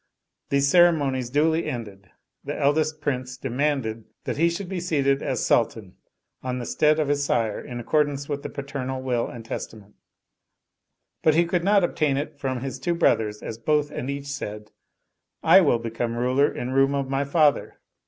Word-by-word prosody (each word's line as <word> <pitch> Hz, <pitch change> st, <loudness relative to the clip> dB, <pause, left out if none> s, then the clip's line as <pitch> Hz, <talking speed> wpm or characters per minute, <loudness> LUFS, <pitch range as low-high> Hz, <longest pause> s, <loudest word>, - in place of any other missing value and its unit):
These 140 Hz, 0 st, +2 dB
ceremonies 140 Hz, -7 st, +3 dB
duly 160 Hz, +4 st, +2 dB
ended, 100 Hz, -5 st, -7 dB, 0.3 s
the -, -, -5 dB
eldest 155 Hz, +2 st, +1 dB
Prince 130 Hz, -3 st, -3 dB
demanded 130 Hz, -4 st, -1 dB, 0.2 s
that -, -, -3 dB
he 165 Hz, +3 st, +4 dB
should 175 Hz, +3 st, -4 dB
be 185 Hz, 0 st, -3 dB
seated 140 Hz, -6 st, +1 dB
as -, -, -1 dB
Sultan -, -, 0 dB, 0.5 s
on 125 Hz, -1 st, -3 dB
the 120 Hz, -, -4 dB
stead 155 Hz, +4 st, +2 dB
of 150 Hz, -, +1 dB
his 145 Hz, 0 st, +1 dB
sire 115 Hz, -6 st, 0 dB
in 120 Hz, -1 st, -7 dB
accordance 145 Hz, +2 st, 0 dB
with 145 Hz, -1 st, -3 dB
the -, -, -6 dB
paternal 130 Hz, -2 st, -5 dB
will 125 Hz, -2 st, 0 dB
and 115 Hz, -2 st, -9 dB
testament; 105 Hz, -2 st, -7 dB, 1.3 s
but 155 Hz, -1 st, +4 dB
he 170 Hz, +1 st, +4 dB
could 170 Hz, 0 st, 0 dB
not 200 Hz, 0 st, +4 dB
obtain 150 Hz, -5 st, +1 dB
it 145 Hz, 0 st, -5 dB
from 130 Hz, -3 st, -2 dB
his 135 Hz, 0 st, -5 dB
two 175 Hz, -1 st, -1 dB
brothers 105 Hz, -10 st, +1 dB
as 115 Hz, -, -6 dB
both 150 Hz, +4 st, +1 dB
and 130 Hz, -, -4 dB
each 140 Hz, 0 st, -4 dB
said, 105 Hz, -7 st, -6 dB, 0.4 s
" -, -, -53 dB
I -, -, +10 dB
will -, -, +3 dB
become 115 Hz, 0 st, -3 dB
ruler 130 Hz, +4 st, +2 dB
in 125 Hz, +1 st, -4 dB
room 135 Hz, +1 st, +3 dB
of 140 Hz, -1 st, -1 dB
my 135 Hz, +1 st, 0 dB
father." 145 Hz, +1 st, +2 dB
140 Hz, 180 wpm, -24 LUFS, 125-150 Hz, 1.3 s, I